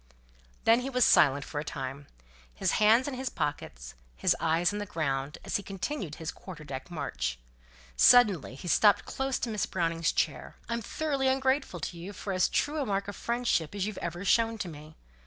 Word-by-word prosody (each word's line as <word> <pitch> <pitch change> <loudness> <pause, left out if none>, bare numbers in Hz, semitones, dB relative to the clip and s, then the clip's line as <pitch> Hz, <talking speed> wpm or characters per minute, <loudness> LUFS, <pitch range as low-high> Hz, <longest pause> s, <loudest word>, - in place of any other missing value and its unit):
Then 230 +1 +5
he 255 +2 -4
was 250 -2 +3
silent 140 -2 +5
for 145 - -4
a - - -3
time; 140 -1 -6 0.5
his - - 0
hands 225 +5 +5
in 285 - -3
his 260 0 -3
pockets, 60 - -4 0.2
his - - +2
eyes 165 +4 +1
on 205 - -3
the 205 - -4
ground, 140 -5 -2
as - - 0
he - - -6
continued 195 - -4
his 160 -1 -5
quarter 170 -5 -10
deck 135 0 -7
march. 140 - -3 0.6
Suddenly 200 - +5
he 155 - -9
stopped 205 +4 +4
close 270 0 -2
to 240 - -3
Miss 210 -2 -1
Browning's 165 0 0
chair: - - -2
"I'm 235 0 -2
thoroughly 280 +3 -1
ungrateful 265 -6 +1
to 170 +3 -5
you, 190 +4 -7
for 195 0 -5
as 185 -1 +2
true 300 +1 0
a - - -1
mark 200 -1 -1
of 205 - -6
friendship 235 -8 -1
as 195 -2 -1
you've 215 -2 -5
ever 175 +3 -5
shown 225 +2 +3
to 205 - -4
me. 155 -1 -11
195 Hz, 195 wpm, -29 LUFS, 155-235 Hz, 0.6 s, Then